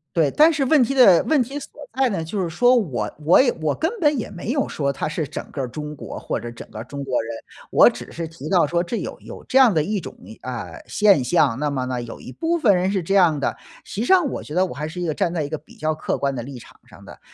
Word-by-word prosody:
对， 155 -4 +3
但 315 +2 +5
是 285 - 0
问 270 +1 +4
题 245 +3 +1
的 200 -10 +7
问 295 -5 +3
题 275 +5 -6
所 - - -10 0.2
在 265 0 +2
呢， 185 -8 -2
就 190 +5 -3
是 175 - -2
说 245 +9 +4
我 175 - 0
我 170 +9 +7
也 260 - +3
我 150 -2 0
根 325 +3 -1
本 295 -4 +3
也 225 - -4
没 195 +5 -5
有 280 0 +1
说 140 -2 -2
他 150 - -3
是 155 -2 -3
整 150 - -7
个 135 -4 -3
中 150 +4 -6
国 145 - -8
或 - - -3
者 120 - -7
整 115 - -10
个 110 - -7
中 140 +2 -6
国 130 -3 0
人。 115 +1 -6 0.4
我 - - +7
只 - - -9
是 170 - -4
提 160 -2 -9
到 180 -5 +4
说 170 +4 0
这 180 +7 -4
有 - - -5
有 - - -11
这 265 - 0
样 245 -7 +6
的 155 -2 +2
一 205 +3 -1
种， - - -9 0.3
呃， 115 -10 -6
现 200 -9 +4
象， 140 -3 +2
那 150 - 0
么 135 -3 -2
呢， 125 -1 -2
有 120 - -9
一 - - -9
部 335 - -1
分 225 -11 +4
人 185 +2 0
是 195 -3 -1
这 195 - -2
样 170 -6 +5
的， - - -1 0.3
实 - - -10
际 235 - 0
上 370 -3 +5
我 - - -4
觉 150 - -9
得 185 +1 +3
我 - - -6
还 150 +2 -4
是 180 +3 -6
一 - - -1
个 155 - -1
站 175 +1 -1
在 160 -3 -1
一 145 - -5
个 155 - -3
比 150 - -19
较 155 +1 -1
客 155 - -3
观 140 -1 -1
的 125 - -4
立 130 -1 -8
场 - - -17
上 - - -16
的。 - - -13
170 Hz, 310 characters per minute, -22 LUFS, 140-230 Hz, 0.4 s, 的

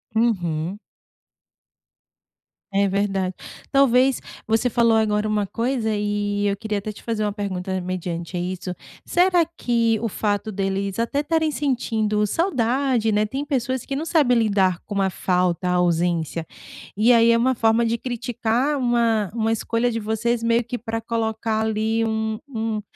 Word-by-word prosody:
Uhum. 185 -5 0 1.9
É 200 0 +2
verdade. 195 -2 -1 0.4
Talvez 265 -1 +4 0.3
você 225 +3 +2
falou 230 -1 +3
agora 210 -1 +1
uma 210 -1 0
coisa, 230 +2 -1
eh, 205 0 0
eu 200 - -3
queria 210 0 -2
até 215 +2 -5
te - - -14
fazer 225 -2 -2
uma 210 - 0
pergunta, 190 -2 -3
mediante 180 -1 -4
a - - -1
isso. 180 0 -4 0.3
Será 355 -1 +3
que 235 -9 0
o 230 - -1
fato 205 +2 -1
deles 195 0 -2
até 235 +5 0
estarem 315 +1 +1
sentindo 225 -7 0
saudade, 255 - +1
né, 210 +1 +2
têm 270 +6 -4
pessoas 260 -3 -1
que 275 - -3
não 305 +4 -3
sabem 290 -8 +3
lidar 195 -5 +2
com 205 -2 -2
a 190 - +2
falta, 180 -1 0
a 180 - +2
ausência. 170 -2 0 0.5
E 230 +4 +5
aí 230 0 +5
é 230 - +4
uma 260 +2 +2
forma 225 +1 +3
de 230 +1 0
criticar 245 +3 -1
uma 235 -5 +1
uma 225 -1 0
escolha 230 +2 0
de 230 - -2
vocês 220 +2 -1
meio 230 +1 +2
que 245 +2 -4
pra 225 -1 -4
colocar, 225 -1 -1
ali, 220 +1 0
um 220 0 -1
um 220 -4 -3
220 Hz, 155 wpm, -22 LUFS, 200-240 Hz, 1.9 s, E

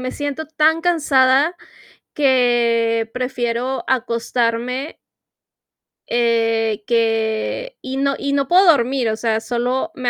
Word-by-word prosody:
me 255 0 -4
siento 290 +1 -4
tan 315 +1 +2
cansada 300 -2 +2 0.6
que 235 -4 +2
prefiero 250 0 -3
acostarme 245 +2 -2 1.1
eh, 225 -2 0
que 225 - -1
y 260 +1 -6
no 275 0 0
y 280 0 -3
no 280 -1 0
puedo 370 +2 +5
dormir. 260 -5 +3
O 220 - -1
sea, 220 -1 0
solo 245 +3 -2
me 250 -2 -1
250 Hz, 115 wpm, -19 LUFS, 230-280 Hz, 1.1 s, puedo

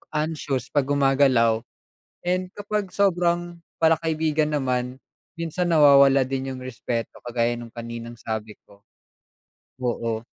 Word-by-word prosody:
anxious 150 -4 -2
'pag 145 -3 +2
gumagalaw, 135 -5 +3 0.6
and 185 +1 0
kapag 205 -1 -3
sobrang 175 -3 +1 0.2
pala 160 -1 +4
kaibigan 155 -2 0
naman, 125 -2 -1 0.4
minsan 170 +1 -2
nawawala 140 -4 +6
din 135 +1 -3
’yung 130 - -8
respeto, 120 -2 -4
kagaya 120 0 +1
ng 120 -1 -9
kaninang 115 0 -7
sabi 110 -1 -5
ko. 100 - -20 1.0
Oo. 115 -2 -2
135 Hz, 115 wpm, -24 LUFS, 120-160 Hz, 1.0 s, nawawala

